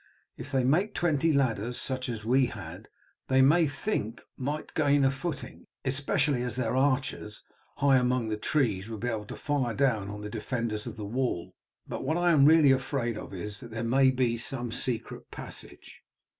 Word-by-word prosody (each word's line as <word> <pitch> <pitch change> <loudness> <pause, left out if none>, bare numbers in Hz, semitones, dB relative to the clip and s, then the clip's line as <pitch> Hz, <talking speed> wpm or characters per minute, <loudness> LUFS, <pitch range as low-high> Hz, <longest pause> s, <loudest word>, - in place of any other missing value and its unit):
If 140 - -9
they 135 -2 +2
make 175 - +2
twenty 160 -1 +2
ladders 120 -4 0
such 130 0 -2
as 110 -3 -5
we 130 +2 +4
had 90 -7 -9 0.4
they 130 0 +4
may 160 +4 +5
think 135 - -2 0.2
they - - -8
might 150 +3 -3
gain 145 -2 +3
a 135 - +4
footing, 140 +1 -6 0.2
especially 135 0 +1
as 125 -2 -2
their 125 -2 -1
archers 130 -5 0 0.3
high 140 -1 +4
among 125 -2 +1
the 110 - 0
trees 105 -4 0
would 110 -2 -6
be 120 - -1
able 110 -3 -3
to - - -8
fire 135 -6 -1
down 110 -8 +1
on 105 0 -6
the 105 - -5
defenders 110 -1 -3
of - - -7
the 105 - -5
wall. 120 -5 -2 0.3
But - - -5
what 160 - 0
I 175 0 +3
am 145 -4 +6
really 155 -2 +7
afraid 130 -3 0
of 105 - -8
is 100 +2 -6
that 120 - -10
there 115 0 -4
may 130 +3 +4
be 125 -3 +1
some 120 0 -3
secret 115 0 -4
passage." - - -10
130 Hz, 190 wpm, -28 LUFS, 115-140 Hz, 0.4 s, really